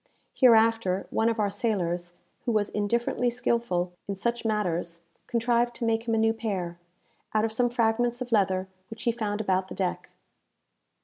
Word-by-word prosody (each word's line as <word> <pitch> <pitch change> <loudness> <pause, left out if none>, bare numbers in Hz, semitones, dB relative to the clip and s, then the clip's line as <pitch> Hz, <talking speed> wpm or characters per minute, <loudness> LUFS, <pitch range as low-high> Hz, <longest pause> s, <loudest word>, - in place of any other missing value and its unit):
Hereafter, 225 -6 +4
one 225 +1 +2
of 230 -1 -2
our 205 -1 +1
sailors, 175 -7 -1 0.3
who 240 - +1
was 210 -2 +1
indifferently 235 +4 0
skilful 235 -7 -1
in 200 - -2
such 235 +5 -2
matters, 175 -6 -1 0.3
contrived 240 0 +1
to 235 - -3
make 225 +1 0
him 225 - +2
a - - +1
new 225 0 +3
pair, 190 -7 -3 0.6
out 215 0 +3
of 225 - -2
some 245 +2 +1
fragments 240 +1 +1
of 250 -1 -5
leather 190 -3 +2 0.2
which 225 0 -9
he 235 - +3
found 215 -2 -2
about 190 -2 0
the - - -8
deck. 185 -2 -2
220 Hz, 170 wpm, -27 LUFS, 190-235 Hz, 0.6 s, Hereafter